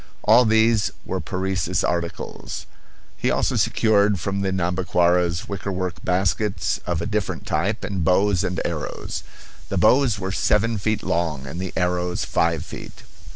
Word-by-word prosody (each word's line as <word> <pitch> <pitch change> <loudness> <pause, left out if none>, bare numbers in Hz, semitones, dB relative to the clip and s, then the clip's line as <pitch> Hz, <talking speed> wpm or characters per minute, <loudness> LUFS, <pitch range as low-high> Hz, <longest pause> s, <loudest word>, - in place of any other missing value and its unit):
All 120 +3 +6
these 110 -1 +3 0.2
were - - -2
Parecis 90 -1 -1
articles. 85 -1 -3 0.5
He - - -1
also - - +1
secured 105 -3 +3
from 100 +3 -2
the 95 -1 0
Nhambiquaras 90 -1 +1
wickerwork 95 -2 -4
baskets 95 +3 0
of 85 -1 -1
a - - -3
different 105 -2 -2
type 100 +8 -1
and 95 -4 -2
bows 95 +2 +3
and 90 -2 -1
arrows. - - -4 0.5
The 100 - -1
bows 115 +4 +4
were 95 -1 -3
seven 105 +3 +1
feet 110 +2 -1
long 80 -6 -1
and 80 +6 -6
the 95 -1 -3
arrows 90 0 0
five 85 -1 0
feet. - - -10
95 Hz, 145 wpm, -23 LUFS, 90-105 Hz, 0.5 s, All